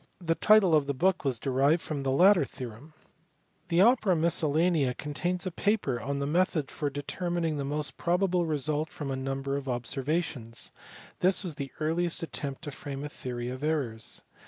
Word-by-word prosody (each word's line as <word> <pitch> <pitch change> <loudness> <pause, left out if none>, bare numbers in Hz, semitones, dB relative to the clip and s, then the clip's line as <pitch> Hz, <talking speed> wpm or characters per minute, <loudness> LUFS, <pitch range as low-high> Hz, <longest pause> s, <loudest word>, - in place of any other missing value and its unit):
The 165 -2 +1
title 210 -1 +5
of 150 -3 +4
the 140 - -1
book 185 +7 +2
was 135 -4 0
derived 140 +6 +2
from 150 -3 -3
the 135 - -1
latter 180 +6 +6
theorem. 130 +4 -9 0.7
The 170 +1 +3
Opera 215 -4 +5
MisCGllcMMd 160 -3 +2
contains 175 +5 -2
a 185 - -2
paper 200 - 0
on 140 +4 -2
the 140 - -1
method 160 -2 +1
for 145 - -2
determining 165 +3 -2
the 140 - -2
most 150 +1 -2
probable 175 0 +1
result 155 +1 -1
from 140 -3 -5
a - - -1
number 135 +1 -2
of 140 -1 -5
observations: 125 -1 -2 0.5
this 185 +2 +2
was 175 -4 -3
the 140 -2 -6
earliest 165 +2 0
attempt 140 -2 -5
to 145 - -5
frame 140 0 -6
a 150 - -4
theory 120 -4 -5
of 130 +2 -6
errors. 130 -8 -2
150 Hz, 175 wpm, -29 LUFS, 135-175 Hz, 0.7 s, latter